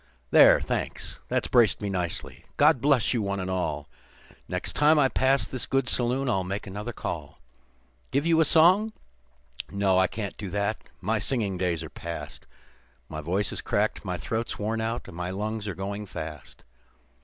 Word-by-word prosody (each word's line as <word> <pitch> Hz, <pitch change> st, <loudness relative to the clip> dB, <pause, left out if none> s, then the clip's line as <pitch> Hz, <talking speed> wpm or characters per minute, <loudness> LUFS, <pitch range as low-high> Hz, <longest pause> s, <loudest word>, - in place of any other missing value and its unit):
"There, -, -, +8 dB
thanks, -, -, -4 dB
that's -, -, 0 dB
braced 120 Hz, -4 st, +4 dB
me 105 Hz, -, -3 dB
nicely; 90 Hz, -4 st, -3 dB
God 150 Hz, -3 st, +5 dB
bless 140 Hz, -4 st, +3 dB
you 120 Hz, -, 0 dB
one 100 Hz, -1 st, -2 dB
and 95 Hz, 0 st, -3 dB
all; 95 Hz, -1 st, -2 dB, 0.6 s
Next -, -, -2 dB
time 150 Hz, +2 st, +5 dB
I 140 Hz, -2 st, +5 dB
pass 135 Hz, +1 st, +2 dB
this 130 Hz, -, -4 dB
good 135 Hz, -1 st, +1 dB
saloon 130 Hz, +1 st, 0 dB
I'll 95 Hz, -6 st, +1 dB
make 100 Hz, +3 st, -4 dB
another 105 Hz, +4 st, -5 dB
call. -, -, -6 dB, 0.7 s
Give 140 Hz, +3 st, 0 dB
you 165 Hz, -1 st, +4 dB
a -, -, +5 dB
song? 185 Hz, +8 st, +5 dB, 0.8 s
No, 100 Hz, -2 st, +2 dB
I 95 Hz, -, +4 dB
can't 100 Hz, +1 st, -5 dB
do 100 Hz, -3 st, -5 dB
that; 100 Hz, +3 st, -1 dB, 0.2 s
my 110 Hz, +4 st, 0 dB
singing 105 Hz, -7 st, +1 dB
days 90 Hz, -3 st, -1 dB
are 80 Hz, -, -7 dB
past; 85 Hz, 0 st, -7 dB, 0.6 s
My 75 Hz, -1 st, -5 dB
voice 95 Hz, +7 st, -1 dB
is -, -, -5 dB
cracked, 105 Hz, +1 st, 0 dB
my 90 Hz, -3 st, -3 dB
throat's 110 Hz, -, -3 dB
worn 110 Hz, +2 st, -1 dB
out, 115 Hz, +2 st, -3 dB
and -, -, -10 dB
my 90 Hz, +1 st, -3 dB
lungs 105 Hz, +3 st, -3 dB
are 100 Hz, -, -3 dB
going 100 Hz, +2 st, -5 dB
fast. 80 Hz, -5 st, -8 dB
105 Hz, 180 wpm, -27 LUFS, 95-125 Hz, 0.8 s, There